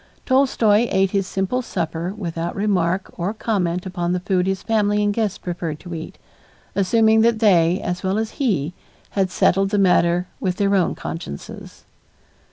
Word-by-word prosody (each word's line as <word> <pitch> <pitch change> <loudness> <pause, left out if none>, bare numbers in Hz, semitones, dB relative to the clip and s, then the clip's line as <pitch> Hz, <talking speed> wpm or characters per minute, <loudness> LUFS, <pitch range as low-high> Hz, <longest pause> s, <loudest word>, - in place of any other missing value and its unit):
Tolstoy 240 -4 +3
ate 190 0 +2
his 195 -2 0
simple 195 +7 -1
supper 170 -5 -3
without 170 -3 -4
remark 190 -2 0
or 190 +6 -2
comment 180 -6 -1
upon 175 -1 -2
the 180 - 0
food 180 0 0
his 195 0 -2
family 210 -2 +1
and 205 0 +1
guests 210 -3 -1
preferred 170 -3 -5
to 175 -2 -8
eat, 160 0 -7 0.6
assuming 220 +3 +3
that 230 0 +3
they, 180 -5 +4
as 180 0 -3
well 190 +1 0
as 220 0 -2
he, 180 - 0 0.4
had 195 -2 0
settled 195 +2 +2
the 205 - 0
matter 180 -2 +3
with 185 -1 -1
their 200 0 +1
own 190 -3 +2
consciences. 75 - -8
190 Hz, 165 wpm, -21 LUFS, 175-210 Hz, 0.6 s, they